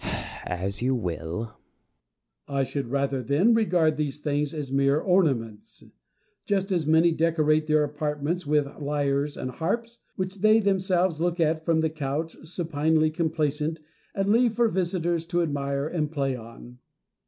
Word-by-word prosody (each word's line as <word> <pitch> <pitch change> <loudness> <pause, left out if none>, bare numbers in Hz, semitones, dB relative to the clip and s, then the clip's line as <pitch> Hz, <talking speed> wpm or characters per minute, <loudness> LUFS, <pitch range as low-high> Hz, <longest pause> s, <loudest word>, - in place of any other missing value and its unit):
Plato. - - -3 0.3
As 95 +4 -3
you 130 +2 +1
will. 85 -6 -3
Diogenes. 110 -1 -6 0.9
I 140 -1 0
should 135 0 -3
rather, 135 +1 -1
then, 145 - +3
regard 175 -8 +2
these 150 -1 -2
things 145 -1 -1
as 150 -4 -5
mere 140 +2 +3
ornaments; 135 - 0 0.6
just 195 -1 0
as 170 -5 0
many 160 +2 +5
decorate 155 -1 +2
their 155 -1 +3
apartments 150 +3 -2
with 150 -1 +3
lyres 145 0 -1
and 130 - -4
harps, 230 - -3 0.2
which 185 +1 -3
they 215 +1 +6
themselves 185 -4 +1
look 175 0 0
at 160 0 +1
from 160 0 +2
the 160 -1 0
couch, 155 +1 -3
supinely 160 -1 +1
complacent, 155 -1 -1 0.4
and 195 0 0
leave 235 0 +3
for 235 -1 +3
visitors 175 -3 0
to 175 0 +1
admire 140 -2 -2
and 155 -3 -2
play 135 -4 -1
on. 120 +1 -12
155 Hz, 155 wpm, -26 LUFS, 140-175 Hz, 0.9 s, they